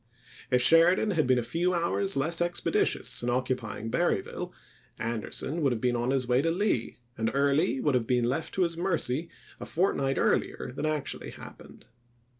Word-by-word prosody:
If 125 -1 +3
Sheridan 175 +7 +5
had 155 -7 +1
been 130 -1 +4
a 120 - 0
few 175 +8 0
hours 170 +2 +1
less 165 +5 +1
expeditious 175 0 0
in 120 - -2
occupying 120 -3 -2
Berryville, - - -1 0.5
Anderson 115 +7 -3
would 140 -3 +2
have 120 - -1
been 125 +1 0
on 120 +1 -1
his 130 -2 +1
way 125 +1 +3
to 165 - +1
Lee, 175 - -1 0.2
and 110 0 +1
Early 140 -2 +2
would 145 0 +1
have 120 -3 0
been 125 -1 +2
left 135 +7 -2
to 190 - +2
his 170 -1 -1
mercy 170 -4 -1 0.3
a - - -6
fortnight 140 -7 0
earlier - - 0
than 155 - -2
actually 155 -2 -3
happened. - - -13
140 Hz, 175 wpm, -28 LUFS, 125-170 Hz, 0.5 s, Sheridan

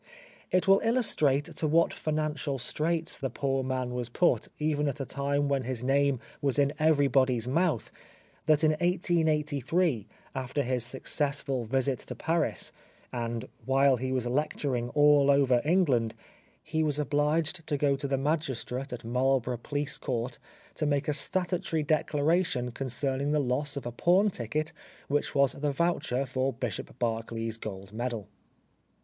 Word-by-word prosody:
It 185 +1 +2
will 195 0 +7
illustrate 180 - +2
to 155 - +1
what 165 +3 +3
financial 155 -2 -2
straits 160 +6 0
the 135 -2 -2
poor 135 +2 -1
man 130 -1 -2
was 125 -1 -3
put 175 +8 +2
even 150 -1 0
at 140 0 -3
a 135 - -2
time 140 +1 0
when 140 -1 +1
his 125 -1 -4
name 140 0 +2 0.2
was 140 -2 +1
in 140 0 +3
everybody's 135 -6 +3
mouth, 155 -2 0 0.6
that 155 0 +4
in 155 - +5
1883 160 - +1 0.3
after 130 +2 -2
his 125 -1 -1
successful 135 0 -1
visit 130 +3 0
to 125 - -7
Paris, 165 +7 -1 0.4
and 115 0 -3 0.2
while 135 0 +4
he 130 +2 -3
was 130 -2 0
lecturing 125 -2 -1
all 145 -1 +5
over 135 -3 +4
England, 145 -9 +2 0.5
he 160 - -1
was 150 -2 +1
obliged 150 +3 0
to 145 - 0
go 140 -1 +2
to 140 +1 -4
the 135 0 0
magistrate 135 -2 -2
at 120 -1 -6
Marlborough 125 0 +1
Police 145 +2 -2
Court 120 -1 -3 0.3
to 155 - -1
make 145 0 0
a - - +2
statutory 175 0 0
declaration 150 -3 +1
con 135 +3 -4
cerning 135 +3 -1
the 150 - +3
loss 140 +2 -1
of 140 - -5
a 120 - -3
pawn 185 - +3
ticket 155 +4 -3 0.3
which 145 +1 -1
was 140 -2 +4
the 145 +2 -2
voucher 145 -4 0
for 130 +1 -1
Bishop 120 -2 -5
Berkeley's 115 -1 -2
gold 100 -2 -8
medal. 115 -3 -3
140 Hz, 155 wpm, -29 LUFS, 125-150 Hz, 0.6 s, will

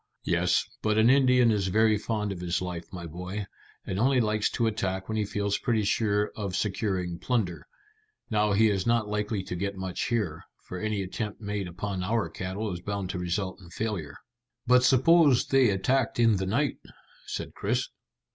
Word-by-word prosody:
"Yes, 90 +1 +2 0.2
but 110 0 +1
an 110 +3 +6
Indian 125 -3 +5
is 100 -3 0
very 110 +3 +3
fond 105 -1 -2
of 95 - -5
his 85 -1 -1
life, 90 -2 -6
my 90 -2 -7
boy, 90 +5 -5 0.4
and 95 - -3
only 130 +2 +3
likes 105 -2 +1
to 115 - 0
attack 95 -4 -2
when 110 - -3
he 105 -1 0
feels 100 0 -1
pretty 115 -4 +1
sure 105 0 +1
of 100 -4 -3
securing 95 -5 -1
plunder. 110 -9 -1 0.6
Now 105 -1 +2
he 110 +3 +5
is 95 0 -1
not 115 -2 +2
likely 105 -1 -1
to 90 - -5
get 100 +2 -3
much 95 -1 -3
here, 105 -10 -1 0.2
for 90 - -5
any 105 -1 -1
attempt 105 +3 -5
made 105 -3 -3
upon 95 +2 -4
our 110 +4 0
cattle 95 +2 -4
is 90 - -6
bound 100 -1 -3
to 90 - -4
result 95 +2 -3
in 85 - -13
failure." 90 -7 -4 0.5
"But 125 0 +5
suppose 135 +1 +5
they 135 -3 +4
attacked 115 +7 +1
in 115 -3 +4
the 95 0 -2
night?" 135 +8 0 0.5
said - - -5
Chris. - - -1
105 Hz, 185 wpm, -28 LUFS, 95-110 Hz, 0.6 s, an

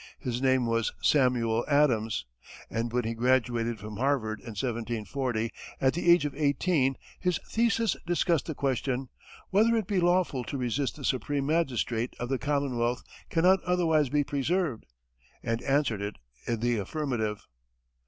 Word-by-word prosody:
His 125 -1 -3
name 130 -2 +3
was 115 0 +1
Samuel 120 -5 +3
Adams, 125 -7 +2 0.5
and 115 +1 -2
when 125 +1 0
he 115 +1 -2
graduated 120 -1 +1
from 105 0 -7
Harvard 125 -5 0
in 115 -3 -9
1740, 115 0 -2 0.3
at 130 0 +3
the 175 +1 0
age 170 -3 +6
of 145 - -2
eighteen, 140 -1 +1 0.2
his 180 -2 +1
thesis 230 0 +1
discussed 170 -3 +1
the 160 - -3
question, 130 -1 -1 0.4
"Whether 220 +4 +4
it 220 -3 0
be 195 0 0
lawful 175 -7 +2
to 140 - -4
resist 130 +2 -1
the 140 - -7
supreme 140 +2 0
magistrate 130 -7 0
if 120 - -3
the 135 -1 0
commonwealth 125 -4 0 0.3
cannot 180 +3 +4
otherwise 165 -5 +2
be 145 +1 +2
preserved," 145 -1 -1 0.6
and 115 +1 -1
answered 135 -7 +1
it 100 +1 -4 0.3
in 115 -2 -1
the 120 -2 +1
affirmative. 110 - -2
130 Hz, 150 wpm, -28 LUFS, 115-150 Hz, 0.6 s, age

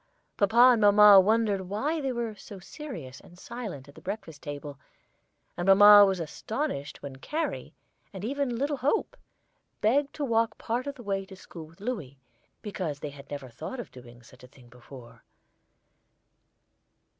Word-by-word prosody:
Papa 235 +5 +5
and 235 -3 +2
mamma 205 -1 +8
wondered 205 -2 +1
why 290 +11 -2
they 270 -2 -2
were 235 -2 -3
so 205 -1 -12
serious 180 - -9
and 175 - -18
silent 205 - -8
at 140 - -15
the - - -15
breakfast 190 -6 -7
table, 145 -1 -8 0.8
and 175 - -4
mamma 205 +1 +9
was 190 -2 -1
astonished 165 - -5
when 135 -2 -8
Carrie, 310 - -4 0.4
and 195 0 -7
even 270 -1 -2
little 285 +3 -1
Hope, 295 - -1 0.6
begged 275 +6 +1
to 295 - -2
walk 230 -2 0
part 245 +4 -3
of 280 - -4
the 245 - -12
way 195 -2 -2
to 190 - -11
school 165 -3 -11
with 165 +1 -21
Louis, 195 - -5 0.5
because 180 -8 -4
they 150 - -6
had 140 0 -14
never 140 -3 -7
thought 160 - -7
of 240 - -8
doing 120 -1 -14
such 125 +2 -18
a - - -12
thing 125 -2 -20
before. 120 -1 -14
200 Hz, 165 wpm, -27 LUFS, 145-240 Hz, 0.8 s, mamma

